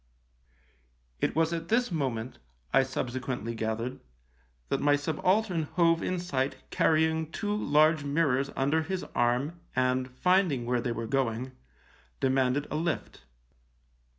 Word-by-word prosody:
" - - -38
It - - 0
was 165 +1 +2
at 165 0 -4
this 240 0 +2
moment, 130 -7 -2 0.3
I - - +6
subsequently 130 -2 -3
gathered, 115 +2 -3 0.7
that - - 0
my 145 0 +4
subaltern 175 +5 +1
hove 165 -2 +4
in 185 - -1
sight 140 -6 -1 0.2
carrying 160 0 +2
two 205 +4 -2
large 155 -4 +3
mirrors 140 -2 +1
under 145 +4 +2
his 185 +3 -3
arm 125 +8 +1 0.2
and, 130 0 +1
finding 165 -2 +2
where 125 0 0
they 120 - -2
were 115 0 -3
going, 130 0 -1 0.7
demanded 130 +1 +1
a 150 - -1
lift. 165 0 -3
140 Hz, 130 wpm, -29 LUFS, 125-165 Hz, 0.7 s, I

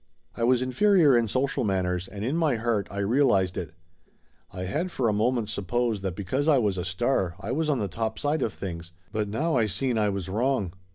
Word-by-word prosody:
I 115 - -3
was 125 +1 +3
inferior 165 +1 +4
in 120 -1 +3
social 130 +4 0
manners, 90 -3 -1
and 100 +2 -6
in 135 +6 0
my 160 -6 +2
heart 110 -3 -1
I 100 - -8
realized 100 -5 +2
it. 85 - -5 0.8
I 90 - -6
had 150 - -2
for 130 -8 -1
a 110 - +2
moment 115 +1 +1
supposed 110 +2 -1
that 95 -3 -3
be 100 - -5
cause 135 - -1
I 150 -3 +5
was 105 -6 +1
a 90 - -3
star 95 -1 0
I 105 - -5
was 155 +3 0
on 145 - +2
the 105 - -1
topside 115 - -2
of 110 - 0
things, 85 -3 -7 0.2
but 105 -1 -1
now 155 +10 0
I 110 -2 +2
seen 115 +5 0
I 105 -1 +2
was 95 -2 -3
wrong. 110 -2 0
110 Hz, 220 wpm, -26 LUFS, 95-130 Hz, 0.8 s, I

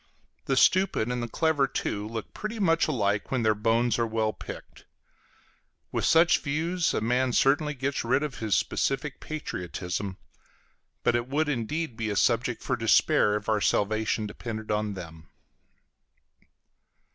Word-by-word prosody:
The - - 0
stupid 185 - +3
and 125 0 -2
the 120 - -3
clever, 150 +2 +1
too, 105 -4 -3
look 110 -1 -6
pretty 215 +2 -5
much 165 -5 +2
alike 105 -8 0
when 130 -3 0
their 110 -1 +4
bones 115 +3 +1
are 115 - +1
well 110 -1 0
picked. - - -10 1.1
With - - -1
such 165 +1 +5
views, 165 +4 -1
a - - 0
man 125 +3 +1
certainly 145 +4 +2
gets 140 +1 -2
rid 130 +5 +1
of 145 -4 -5
his 110 -3 +1
specific 135 +1 -1
patriotism; 95 - -5 0.9
but 120 - +3
it 120 0 -1
would 150 +4 0
indeed 140 +2 -2
be 115 -2 -2
a 105 - -2
subject - - +1
for - - 0
despair 105 - +3
if 105 -1 -4
our 110 -2 +1
salvation 110 +2 +1
depended 110 +1 -6
on 105 -1 -1
them. 80 -3 -10
120 Hz, 150 wpm, -27 LUFS, 105-150 Hz, 1.1 s, such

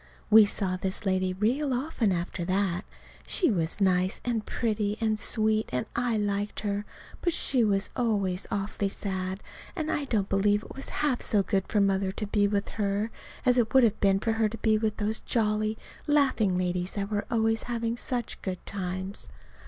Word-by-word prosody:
We 220 0 +9
saw 190 -3 -1
this 190 +2 -4
lady 185 -1 +1
real 250 +9 0
often 245 -5 0
after 175 0 -2
that. 185 0 0 0.4
She 355 - +4
was 170 -1 -1
nice 185 -1 +2
and 235 -3 0
pretty 215 -3 -1
and 220 -2 +1
sweet, 215 0 +1
and 125 0 -1
I 240 -2 +1
liked 205 0 -1
her; 205 0 -2 0.4
but 345 - +1
she 260 -6 +1
was 200 -2 +1
always 200 -7 0
awfully 200 0 -1
sad, 190 -1 -4 0.3
and 315 -3 -2
I 290 - -1
don't 210 -7 0
believe 205 +2 +2
it - - -10
was 270 - -6 0.2
half 260 -5 +1
so 205 -3 +2
good 195 0 0
for 210 - +1
Mother 195 -1 +2
to 210 - -3
be 205 0 +2
with 200 -1 0
her 205 +1 -1 0.3
as 250 -1 +5
it 230 +1 0
would 265 - +8
have 225 -4 +3
been 195 -1 +3
for 225 +2 0
her 225 -1 +2
to 230 - -7
be 220 0 +2
with 215 0 0
those 215 +1 0
jolly, 215 -1 0 0.3
laughing 265 -10 +3
ladies 180 0 -1
that 200 0 -3
were 205 -1 -1
always 225 -1 +1
having 230 -1 -1
such 245 -2 -3
good 185 -2 -5
times. 190 0 -3
210 Hz, 185 wpm, -28 LUFS, 195-225 Hz, 0.4 s, We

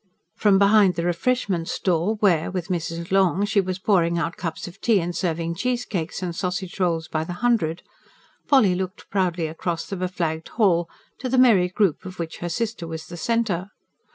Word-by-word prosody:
From 205 +1 +3
behind 200 -2 +5
the 170 +1 -2
refreshment 180 -1 0
stall 180 +4 0
where, 175 -7 +3
with 180 -1 -4
Mrs. 170 -1 -3
Long, 195 0 +3
she 205 -1 +2
was 185 -1 -3
pouring 175 -3 +2
out 165 0 -2
cups 165 0 -5
of 180 +2 -12
tea 225 -4 +3
and 175 0 -3
serving 170 -2 -1
cheesecakes 200 -6 -2
and 175 -2 -3
sausage 180 +1 -3
rolls 165 -3 0
by 155 0 -2
the 175 - -5
hundred, 180 -6 0 0.6
Polly 260 -10 +5
looked 185 +2 -5
proudly 180 -4 0
across 165 +2 -3
the 195 - -5
beflagged 175 -3 -2
hall, 175 -6 +3 0.3
to 255 - -3
the 260 - +1
merry 215 -8 +5
group 185 -4 +1
of 185 -1 -9
which 165 -1 -5
her 175 - -3
sister 215 -1 -3
was 160 -1 -6
the 175 - -9
centre. 200 -1 -1
180 Hz, 180 wpm, -23 LUFS, 170-200 Hz, 0.6 s, behind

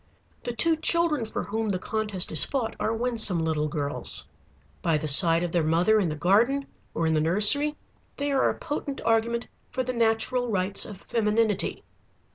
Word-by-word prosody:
The 240 - -4
two 320 +7 +2
children 320 -5 +2
for 220 - -5
whom 215 +3 -3
the 190 - 0
contest 210 -1 -3
is 155 - +6
fought 255 -5 -3
are - - -1
winsome 225 -5 +1
little 155 -1 -1
girls. 145 -2 -2 0.5
By 165 -2 +1
the 155 - -4
side 165 +3 +5
of 175 - -3
their 170 -2 +1
mother 175 +8 +2
in 185 -5 0
the 150 - -4
garden 225 - +2 0.3
or 165 - -1
in 160 - +1
the 155 - +1
nursery 210 - +3 0.4
they 285 0 -2
are 270 -1 +2
a - - -4
potent 285 -1 -5
argument 230 +1 0 0.2
for 255 0 -3
the 255 0 -4
natural 235 +2 0
rights 195 -1 -1
of 200 -2 -11
femininity. 215 -2 0
220 Hz, 180 wpm, -26 LUFS, 175-245 Hz, 0.5 s, is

